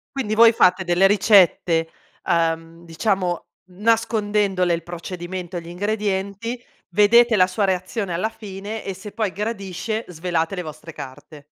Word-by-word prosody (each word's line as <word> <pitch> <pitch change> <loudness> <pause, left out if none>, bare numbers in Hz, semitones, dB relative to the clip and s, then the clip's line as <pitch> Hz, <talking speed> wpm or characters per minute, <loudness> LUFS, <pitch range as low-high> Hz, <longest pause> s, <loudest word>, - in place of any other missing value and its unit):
Quindi 215 -5 -1
voi 230 +1 +8
fate 185 -4 +3
delle 175 +2 +4
ricette, 185 -5 +4 0.4
uhm, 165 -1 -1
diciamo 180 +1 -1 0.3
nascondendole 205 -3 +1
il 170 -1 -2
procedimento, 175 +1 -6
gli 165 - -11
ingredienti, 205 +4 -2 0.3
vedete 220 +4 +5
la 185 - +5
sua 185 +3 -2
reazione 185 +1 -1
alla 180 +6 0
fine 210 0 -7
e 195 - -4
se 200 +3 -10
poi 215 -3 -1
gradisce 210 +1 -4
svelate 170 +1 -2
le 180 - -4
vostre 155 +1 -9
carte. 145 +1 -11
190 Hz, 135 wpm, -22 LUFS, 175-210 Hz, 0.4 s, voi